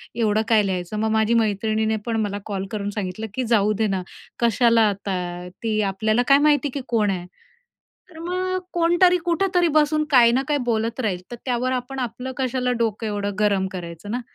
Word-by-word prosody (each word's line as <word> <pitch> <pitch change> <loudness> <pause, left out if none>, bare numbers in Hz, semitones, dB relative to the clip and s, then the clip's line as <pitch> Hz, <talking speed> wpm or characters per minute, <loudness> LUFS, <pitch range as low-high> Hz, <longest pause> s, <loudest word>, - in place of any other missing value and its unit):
एवढं 220 -2 +1
काय 220 -2 +4
लिहायचं? 185 +1 -3
मग 220 +1 0
माझी 220 +1 +2
मैत्रिणीने 220 +1 0
पण 230 -2 -1
मला 205 -1 -2
कॉल 195 -2 -3
करून 205 -1 -3
सांगितलं, 205 +1 -4
की 255 - -2
जाऊ 210 0 +3
दे 215 - +3
ना. 190 -2 -1 0.4
कशाला 235 0 +3
आता? 195 -1 -3 0.5
ती 215 -2 0
आपल्याला 215 +4 +1
काय 275 0 +7
माहिती 295 -1 +3
आहे, 280 +1 -4
की 255 - -9
कोण 215 -4 +1
आहे? 180 -2 -4 0.8
तर 320 - -13
मग 370 +2 -2 0.2
कोणतरी 345 +1 +4
कुठेतरी 355 0 +2
बसून 305 0 +3
काही 240 -3 +6
ना 255 - +2
काही 295 -1 +1
बोलत 230 0 -1
राहील, 195 -6 -1
तर - - -4
त्यावर 250 0 0
आपण 255 +1 -3
आपलं 250 +1 -4
कशाला 255 -1 0
डोकं 225 -1 -1
एवढं 205 -1 -3
गरम 200 -2 +2
करायचं 175 +2 -7
ना? 245 - -1
225 Hz, 190 wpm, -22 LUFS, 205-260 Hz, 0.8 s, काय